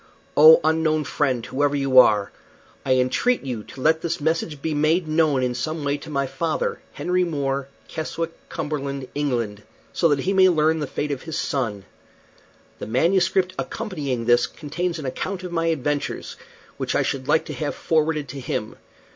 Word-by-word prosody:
Oh, 155 +2 +9
unknown 155 -1 +2
friend! 130 -6 -1
whoever 145 +2 0
you 135 -2 +5
are. 105 -4 +4 0.5
I 130 -1 +2
entreat 130 - +1
you 125 -5 -3
to 135 - -11
let 160 +3 +3
this 170 -1 -2
message 160 -1 -1
be 160 +2 -2
made 155 +3 +2
known 155 -4 +2
in 125 -1 0
some 150 +6 -3
way 140 0 0
to 145 - -11
my 140 -2 0
father, 145 +5 -2
Henry 180 +5 0
More, 140 -5 -2 0.2
Keswick, 165 +1 -4 0.2
Cumberland, 140 -3 -4
England, 120 -8 -2 0.3
so 170 - +3
that 145 -3 +1
he 190 +6 0
may 190 -1 +6
learn 160 -1 +2
the 150 - -2
fate 145 +2 -3
of 140 - -3
his 160 -1 -5
son. 110 -8 -2 0.9
The - - -6
MS. 170 - +3 0.3
accompanying 145 - -3
this 120 0 +4
contains 170 +3 -4
an 155 - -6
account 185 +8 -4
of 180 - -6
my 165 -1 0
adventures, 145 -2 -2 0.4
which - - -2
I - - +3
should 135 -1 -3
like 160 - +3
to - - -6
have 150 -2 -3
forwarded 155 -2 0
to 140 - -6
him. 110 -4 -4
150 Hz, 175 wpm, -23 LUFS, 135-160 Hz, 0.9 s, Oh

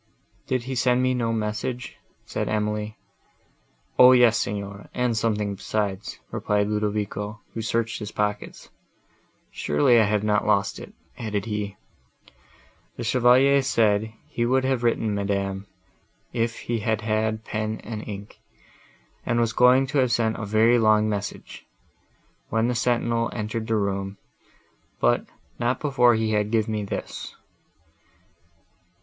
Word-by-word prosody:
"Did 130 -2 0
he 130 +2 -4
send 125 0 +2
me 130 0 +2
no 115 -2 0
message?" 110 +3 -3 0.3
said - - -3
Emily. 105 0 -2 1.0
"O 125 0 +9
yes, 120 -2 +6
Signora, 100 0 -4
and 125 -2 +1
something 105 -2 0
besides," 100 0 -3
replied 105 -1 0
Ludovico, 105 0 -2
who 115 - -4
searched 115 +1 -1
his 105 -1 -6
pockets. 105 0 -3 0.8
"Surely, 75 +12 +3
I 110 - +5
have 105 0 0
not 105 -1 +2
lost 100 -1 +1
it," - - -10 0.3
added 105 -3 -2
he. 105 -3 -4 1.2
"The 120 - -4
Chevalier 125 +4 +4
said, 110 -4 +2 0.2
he 120 - -2
would 130 +2 +2
have 130 -2 0
written, 115 -2 +1
madam, 100 -1 -2 0.7
if 115 -1 -1
he 115 -1 -2
had 110 0 -1
had 110 0 -1
pen 110 0 -3
and 110 -1 -5
ink, 100 0 -8 0.8
and 120 - 0
was 115 -1 +1
going 125 +2 +5
to 140 +2 0
have 130 -2 +2
sent 115 -1 +1
a 105 - -5
very 110 +3 +4
long 110 -1 +4
message, 105 -1 -5 0.8
when 115 +2 +1
the - - +1
sentinel 120 -1 +1
entered 110 0 -3
the 115 - +1
room, 100 -1 -2 0.8
but - - +2 0.3
not 120 +1 0
before 125 -5 +4
he 110 0 0
had 105 -1 +1
give 110 -1 +1
me 110 -1 -2
this." 100 - -6
110 Hz, 140 wpm, -24 LUFS, 105-120 Hz, 1.2 s, O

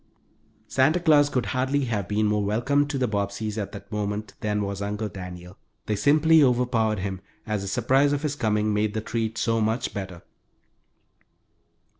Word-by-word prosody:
Santa 140 +9 +3
Claus 150 -4 +4
could 125 -4 -1
hardly 135 +2 0
have 105 -6 -2
been 105 +1 +1
more 105 0 +1
welcome 120 +8 +1
to 145 -1 -3
the 130 -1 +1
Bobbseys 105 0 -2
at 100 -1 -4
that 100 - -11
moment 105 0 -3
than 105 -1 -1
was 100 0 -4
Uncle 105 +1 -3
Daniel. 90 -1 -9 0.3
They 105 - -1
simply 155 +7 +4
overpowered 120 -5 +2
him, 95 -1 -4 0.2
as 105 -3 -2
the 100 - -5
surprise 130 +7 +2
of 145 +1 -1
his 150 -2 -1
coming 105 -4 0
made 105 +1 0
the 110 - -1
treat 115 0 -3
so 115 -1 +1
much 110 +3 -1
better. 95 -4 -6
110 Hz, 170 wpm, -25 LUFS, 105-130 Hz, 0.3 s, Claus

